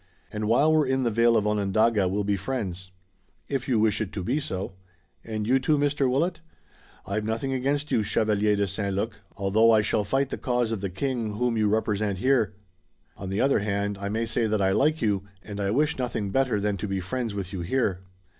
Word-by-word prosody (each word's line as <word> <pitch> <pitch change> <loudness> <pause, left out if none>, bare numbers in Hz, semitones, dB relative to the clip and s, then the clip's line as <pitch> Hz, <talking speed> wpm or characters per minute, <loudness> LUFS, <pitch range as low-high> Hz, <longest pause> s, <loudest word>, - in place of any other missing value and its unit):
"And 105 0 -3
while 145 +8 +4
we're 155 -3 +3
in 130 0 +1
the 120 - +1
vale 115 +1 +4
of 105 - +1
Onondaga 105 0 +2
we'll 100 +3 -1
be 100 0 +1
friends." 95 -4 -4 0.6
"If 135 -2 -2
you 120 -5 +2
wish 110 0 +2
it 105 - -3
to 95 - -4
be 130 +10 0
so." 95 -10 -4 0.5
"And 110 -2 -4
you 130 +4 +3
too, 150 +3 +2
Mr. 145 -2 +1
Willet?" 165 +7 0 0.6
"I've 105 +2 -2
nothing 115 +5 -2
against 140 +3 -1
you, 110 - +3
Chevalier 105 0 +1
de 100 0 +1
St. 100 +1 -2
Luc, 105 +1 -3 0.2
although 105 +3 +3
I 110 -2 +6
shall 105 0 +1
fight 135 +6 0
the - - -4
cause 120 -3 0
of 110 -4 -2
the 100 - -2
king 115 +2 -2
whom 120 +1 0
you 110 -2 +2
represent 105 -2 0
here. 120 -3 +2 0.6
On 95 - -7
the 95 +2 -1
other 135 -3 +3
hand 100 -1 -2
I 100 - -2
may 110 +2 -1
say 115 0 0
that 110 -1 0
I 95 -1 +2
like 150 +7 +2
you 100 -3 +1 0.2
and 105 -1 -7
I 100 -1 0
wish 150 +7 +1
nothing 110 -5 -2
better 130 -4 +1
than 100 0 -1
to 105 - -4
be 95 -1 -2
friends 115 +4 -3
with 95 -1 -5
you 95 - -3
here." 95 -1 0
110 Hz, 220 wpm, -26 LUFS, 100-125 Hz, 0.6 s, I